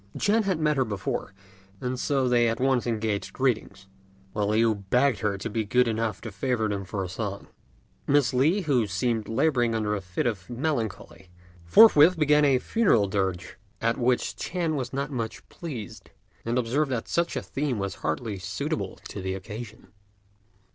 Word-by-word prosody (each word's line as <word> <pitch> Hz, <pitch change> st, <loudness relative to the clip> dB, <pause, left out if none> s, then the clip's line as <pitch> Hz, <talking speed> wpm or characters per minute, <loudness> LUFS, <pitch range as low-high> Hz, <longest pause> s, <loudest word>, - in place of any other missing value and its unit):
Ch'ên 215 Hz, +1 st, +2 dB
had 190 Hz, -4 st, +1 dB
met 150 Hz, -2 st, +1 dB
her 130 Hz, -, +3 dB
before, 100 Hz, -4 st, -3 dB, 0.5 s
and 125 Hz, 0 st, -3 dB
so 135 Hz, -2 st, +1 dB
they 120 Hz, -1 st, +3 dB
at 115 Hz, -, -2 dB
once 130 Hz, -2 st, +1 dB
exchanged 110 Hz, -3 st, -2 dB
greetings, 120 Hz, -6 st, -1 dB, 0.5 s
while 105 Hz, -1 st, 0 dB
Liu 110 Hz, +2 st, +3 dB
begged 120 Hz, +5 st, +1 dB
her 105 Hz, -2 st, -1 dB
to 95 Hz, -, -4 dB
be 110 Hz, +1 st, -1 dB
good 125 Hz, +4 st, +2 dB
enough 110 Hz, -3 st, -1 dB
to 115 Hz, -, -7 dB
favour 110 Hz, +2 st, -1 dB
them 100 Hz, -2 st, -2 dB
with -, -, -21 dB
a 95 Hz, -2 st, -1 dB
song. 100 Hz, +2 st, -5 dB, 0.6 s
Miss 140 Hz, -2 st, +3 dB
Li, 155 Hz, +11 st, +3 dB
who 130 Hz, -, +1 dB
seemed 110 Hz, +3 st, -1 dB
labouring 120 Hz, -2 st, +2 dB
under 105 Hz, -1 st, 0 dB
a 105 Hz, -, -2 dB
fit 90 Hz, -1 st, -3 dB
of 105 Hz, -7 st, -2 dB
melancholy, 115 Hz, -, -3 dB, 0.4 s
forthwith 170 Hz, -, +7 dB
began 150 Hz, -1 st, +4 dB
a 135 Hz, -2 st, +4 dB
funeral 145 Hz, -, +2 dB
dirge; 95 Hz, -3 st, -2 dB, 0.2 s
at 115 Hz, +2 st, 0 dB
which 125 Hz, 0 st, +1 dB
Ch'ên 170 Hz, -3 st, -2 dB
was 130 Hz, -4 st, -3 dB
not 140 Hz, +1 st, -3 dB
much 115 Hz, -4 st, -5 dB
pleased, 125 Hz, -, -8 dB, 0.4 s
and 115 Hz, +2 st, 0 dB
observed 130 Hz, +5 st, +1 dB
that 120 Hz, -3 st, -2 dB
such 170 Hz, 0 st, 0 dB
a -, -, -2 dB
theme 140 Hz, -4 st, -2 dB
was 100 Hz, -1 st, -2 dB
hardly 95 Hz, +6 st, -2 dB
suitable 140 Hz, -, -3 dB
to 100 Hz, -, -6 dB
the 95 Hz, 0 st, -2 dB
occasion. 105 Hz, +4 st, -9 dB
120 Hz, 175 wpm, -26 LUFS, 105-140 Hz, 0.6 s, forthwith